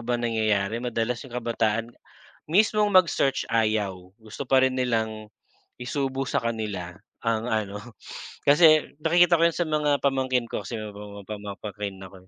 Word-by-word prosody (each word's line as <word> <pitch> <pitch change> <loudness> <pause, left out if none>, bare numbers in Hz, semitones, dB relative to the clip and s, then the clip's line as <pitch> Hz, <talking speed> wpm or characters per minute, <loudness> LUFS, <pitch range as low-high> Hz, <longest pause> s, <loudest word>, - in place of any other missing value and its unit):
ba 120 +1 -1
nangyayari 110 -2 0
madalas 120 -1 -2
'yong 125 -3 -8
kabataan 115 -1 -1 0.6
mismong 210 +4 +3
mag-search 170 -7 +3
ayaw, 110 -3 +1 0.2
gusto 110 +3 -9
pa 130 -1 +5
rin 130 - +2
nilang 110 -4 -1 0.5
isubo 135 +1 -2
sa - - -1
kanila 105 -6 -4 0.3
ang 115 -1 0
ano. 105 -3 -1 0.7
Kasi 155 0 +5
nakikita 175 +1 +5
ko - - +5
'yon - - -3
sa 175 - 0
mga 150 -2 +1
pamangkin 130 -3 0
ko - - -4
kasi 115 -3 -5
may 105 - -6 0.4
pamangkin 100 -1 -6
ako 95 -1 -12
eh, - - -25
115 Hz, 145 wpm, -25 LUFS, 110-135 Hz, 0.7 s, pa